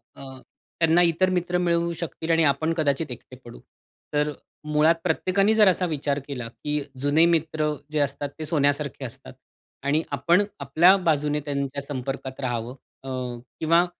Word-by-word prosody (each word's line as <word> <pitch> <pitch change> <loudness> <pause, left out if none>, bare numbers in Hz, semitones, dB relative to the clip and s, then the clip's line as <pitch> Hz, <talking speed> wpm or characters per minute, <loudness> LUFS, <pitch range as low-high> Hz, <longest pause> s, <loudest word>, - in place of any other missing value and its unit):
अ, - - -13 0.6
त्यांना 165 +1 +4
इतर 175 +2 +3
मित्र 180 -1 0
मिळू 170 -1 +1
शकतील 165 -1 -5
आणि 165 0 +4
आपण 160 +4 -1
कदाचित 150 -2 0
एकटे 125 +1 -9
पडू. 120 0 -11 0.5
तर 150 0 +1 0.3
मुळात 150 +2 +3
प्रत्येकाने 185 +5 +2
जर 215 -2 +5
असा 185 0 +3
विचार 145 -3 -1
केला, 125 -5 -5
की 150 +5 -3 0.2
जुने 145 +4 +4
मित्र 160 -2 +1 0.2
जे 155 - 0
असतात 140 0 -1
ते 155 - -4
सोन्यासारखे 145 -3 0
असतात - - -10 0.5
आणि 145 +3 +2
आपण 170 +8 +3 0.2
आपल्या 160 +7 +5
बाजूने 150 -1 +1
त्यांच्या 140 -1 -3
संपर्कात 135 -1 -5
रहावं 120 -1 -3 0.3
अ, 135 - -7 0.5
किंवा 165 +2 +4
150 Hz, 150 wpm, -25 LUFS, 140-170 Hz, 0.6 s, जर